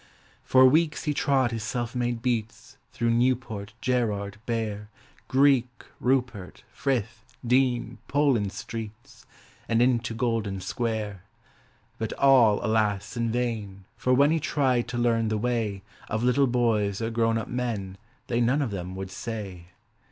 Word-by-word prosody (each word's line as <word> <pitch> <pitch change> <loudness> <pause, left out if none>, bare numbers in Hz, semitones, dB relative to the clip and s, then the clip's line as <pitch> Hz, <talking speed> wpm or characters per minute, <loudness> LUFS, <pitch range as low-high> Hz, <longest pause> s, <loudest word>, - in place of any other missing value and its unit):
For 130 0 +6
weeks 155 +4 +3
he 150 - 0
trod 135 -4 +2
his 115 -1 -3
self 120 0 -3
made 120 -2 -2
beats 115 -3 -3 0.2
Through 115 0 0
Newport, 115 -4 0
Gerrard, 105 -5 -1
Bear, 105 -3 -3 0.4
Greek, 135 -2 +4 0.3
Rupert, 125 -7 -1
Frith, 115 -5 -2 0.2
Dean, 125 -1 +1
Poland 135 -9 +2
Streets, 110 +3 -8 0.4
And 115 - +2
into 120 -2 +2
Golden 115 -4 -1
Square: 110 -2 -3 0.8
But 110 -1 -3
all, 125 -8 +4
alas, 105 -1 0
in 115 -1 -1
vain, 110 -5 -3
for 125 - -1
when 140 +4 +5
He 165 - +2
tried 130 -5 +1
to 120 +1 -4
learn 115 -2 +2
the 110 0 0
way 110 -4 -1 0.3
Of 110 +2 -1
little 135 +3 +3
boys 110 -5 +1
or 115 0 -2
grown 115 0 +1
up 115 - -4
men 110 -6 -3 0.3
They 120 0 0
none 130 +5 +2
of 120 - -3
them 90 -1 -5
would 95 0 -6
say. 100 -6 -6
115 Hz, 145 wpm, -26 LUFS, 105-125 Hz, 0.8 s, For